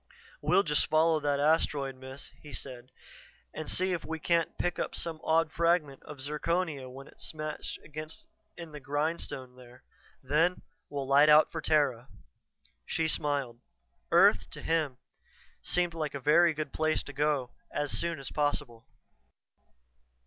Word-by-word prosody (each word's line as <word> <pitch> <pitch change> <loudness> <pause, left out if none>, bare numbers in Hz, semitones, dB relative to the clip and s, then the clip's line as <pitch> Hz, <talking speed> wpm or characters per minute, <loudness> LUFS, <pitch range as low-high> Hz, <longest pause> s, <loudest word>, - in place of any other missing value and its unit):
"We'll 195 - +4
just 150 -4 +2
follow 160 +1 +4
that 145 -1 0
asteroid, 145 -2 +2
Miss," 130 +1 -8
he 150 - -11
said, 125 -2 -6 0.6
"and 155 0 -5
see 185 0 +1
if 175 - -3
we 160 - -4
can't 170 0 0
pick 175 - -1
up - - -2
some 165 -2 -3
odd 160 0 +2
fragment 165 -5 +1
of 150 - -10
zirconia 150 -1 -1
when 135 +2 -10
it's - - -7
smashed 155 -1 -4 0.8
in 170 -2 -8
the 150 - -8
grindstone 145 -2 -2
there. 125 0 -15 0.4
Then 160 +7 +2 0.3
we'll 140 -2 -3
light 140 +2 +6
out 150 +1 +7
for 160 - -4
Terra." 140 -6 +2 0.8
She 160 - 0
smiled. 140 -6 -1 0.5
Earth, - - +5
to - - -7
him, 155 -6 0 0.6
seemed 175 -1 +1
like 155 -3 -3
a - - -3
very 155 +4 +5
good 150 -2 -4
place 155 0 +1
to 145 - -9
go 145 -3 0 0.2
as 145 -1 -2
soon 170 -1 0
as 135 - -6
possible. 145 -6 -1
150 Hz, 150 wpm, -30 LUFS, 140-160 Hz, 0.8 s, out